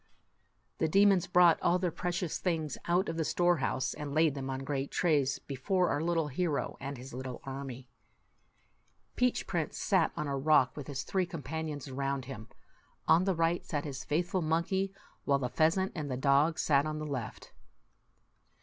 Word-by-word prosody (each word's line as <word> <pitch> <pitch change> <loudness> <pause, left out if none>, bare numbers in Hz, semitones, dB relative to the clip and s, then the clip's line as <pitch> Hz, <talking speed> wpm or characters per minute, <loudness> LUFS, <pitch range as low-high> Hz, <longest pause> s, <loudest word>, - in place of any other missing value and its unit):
The 160 - +2
demons 195 +1 +4
brought 175 -2 +5
all 175 - +3
their 180 -1 -1
precious 180 -1 -2
things 160 -5 -1
out 175 +2 +2
of 165 - -3
the 165 - +1
storehouse, 145 -8 +1
and 145 -1 -6
laid 160 -2 +4
them 135 -1 -5
on 135 0 -3
great 140 0 -2
trays 145 -6 +1
before 175 +7 0
our 145 - 0
little 165 -2 0
hero 145 -2 -1
and 140 0 -5
his 130 +1 -10
little 130 0 -6
army. 135 -2 -7 1.3
Peach 250 0 +1
Prince - - -2
sat - - +2
on 150 - -1
a 140 -1 -2
rock, 135 -2 +3
with 145 -3 -7
his 140 -1 -4
three 185 -2 0
companions 160 -4 -5
around 135 0 -2
him. 120 -4 -8 0.6
On 175 +3 +5
the 190 -2 +1
right 165 +1 +1
sat 145 -2 -3
his 135 -3 -5
faithful 175 +4 0
monkey, 170 +5 0 0.3
while 140 - +3
the 125 -2 -2
pheasant 165 +8 +2
and 150 -4 -4
the 130 - -2
dog 140 +4 +3
sat 145 0 +3
on 155 0 -3
the 155 - -4
left. 130 -7 -5
150 Hz, 175 wpm, -31 LUFS, 135-175 Hz, 1.3 s, brought